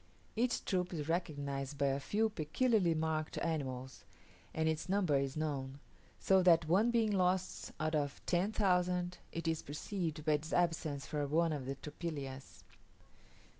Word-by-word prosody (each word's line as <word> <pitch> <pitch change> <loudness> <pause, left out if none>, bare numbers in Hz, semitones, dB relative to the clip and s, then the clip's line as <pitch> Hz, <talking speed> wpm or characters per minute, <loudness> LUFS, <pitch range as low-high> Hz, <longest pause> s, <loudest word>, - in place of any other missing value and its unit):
Each 240 +2 0
troop 180 -1 0
is 150 -2 -3
recognized 145 -5 -2
by 140 - +1
a 135 +1 0
few 220 +9 +1
peculiarly 190 - +2
marked 155 -1 -1
animals, 130 -5 -3 0.5
and 160 0 0
its 160 +2 -1
number 185 -6 +2
is 135 +1 0
known: 140 -3 -2 0.4
so 190 -1 +4
that, 170 -3 +5
one 195 +8 +4
being 230 -3 +2
lost 185 -1 0
out 155 +1 0
of 145 -2 -1
ten 180 +4 +1
thousand, 180 -3 +1
it 165 0 -4
is 160 -1 0
perceived 155 +1 -4
by 155 - +3
its 150 +2 -2
absence 160 -5 0
from 145 -2 -2
one 165 +1 +2
of 135 -3 -4
the 135 - -2
tropillas. 140 -3 -6
160 Hz, 155 wpm, -35 LUFS, 145-180 Hz, 0.5 s, that